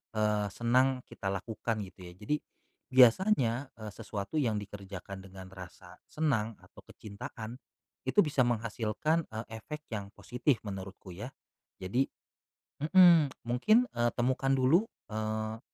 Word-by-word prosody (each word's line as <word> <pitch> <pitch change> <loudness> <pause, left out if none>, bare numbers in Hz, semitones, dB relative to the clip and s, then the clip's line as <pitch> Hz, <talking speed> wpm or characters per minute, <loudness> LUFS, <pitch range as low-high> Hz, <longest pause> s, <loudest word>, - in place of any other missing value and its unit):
eee, 105 -1 +2
senang 125 +4 +2
kita 95 - -7
lakukan 105 +3 -2
gitu 95 -1 -11
ya. 90 - -10
Jadi 105 +10 -1 0.6
biasanya, 130 - +5
eee, 110 -1 -7
sesuatu 105 +6 -4
yang 115 -7 +1
dikerjakan 100 -1 -8
dengan 95 0 -10
rasa 90 -1 -12
senang 115 -8 0
atau - - -18
kecintaan 110 +3 -8 0.4
itu - - -4
bisa 145 -3 +1
menghasilkan, 120 +6 0
eee, 110 +1 -5 0.2
efek 150 +5 -7
yang 100 -2 -4
positif 125 +1 0
menurutku 95 -1 -7
ya. 105 +8 -6 0.5
Jadi 110 +9 0 0.7
mhm, 170 -2 +7 0.2
mungkin, 215 - +4
eee, 120 0 +2
temukan 130 +2 +1
dulu, 145 +11 +4 0.2
eee, 110 +1 -2
115 Hz, 125 wpm, -31 LUFS, 100-130 Hz, 0.7 s, mhm